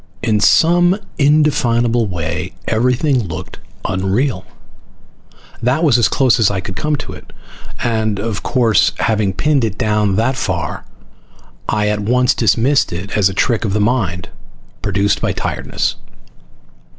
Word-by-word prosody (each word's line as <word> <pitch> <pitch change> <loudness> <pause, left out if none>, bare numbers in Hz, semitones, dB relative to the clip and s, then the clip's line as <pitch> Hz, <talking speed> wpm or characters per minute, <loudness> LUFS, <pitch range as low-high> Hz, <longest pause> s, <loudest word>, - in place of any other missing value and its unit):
In 110 -3 +1
some 175 - +4 0.2
indefinable 120 -6 +2
way 85 0 -4
everything 125 +4 +1
looked 85 +2 -8 0.3
unreal. 95 +2 -1 1.2
That 125 +7 +1
was 140 -7 +4
as 115 - +4
close 130 -2 +2
as 110 - +4
I 100 -2 -2
could 95 +1 -7
come 150 +6 -1
to - - -7
it, - - -13 0.5
and 110 -3 0
of 105 -1 -3
course 115 -4 +2
having 110 -3 +1
pinned 145 +6 +1
it 105 -3 -2
down 105 -2 +1
that 125 +5 0
far 90 -9 -3 0.8
I 105 -1 +1
at 105 0 -1
once 125 +4 +2
dismissed 135 +5 +2
it 90 +3 -5
as 100 -3 +3
a - - -5
trick 115 +2 +1
of 100 -4 -1
the 105 - +1
mind 105 -6 -1 0.5
produced 100 0 0
by - - 0
tiredness. - - -3
110 Hz, 140 wpm, -17 LUFS, 100-125 Hz, 1.2 s, some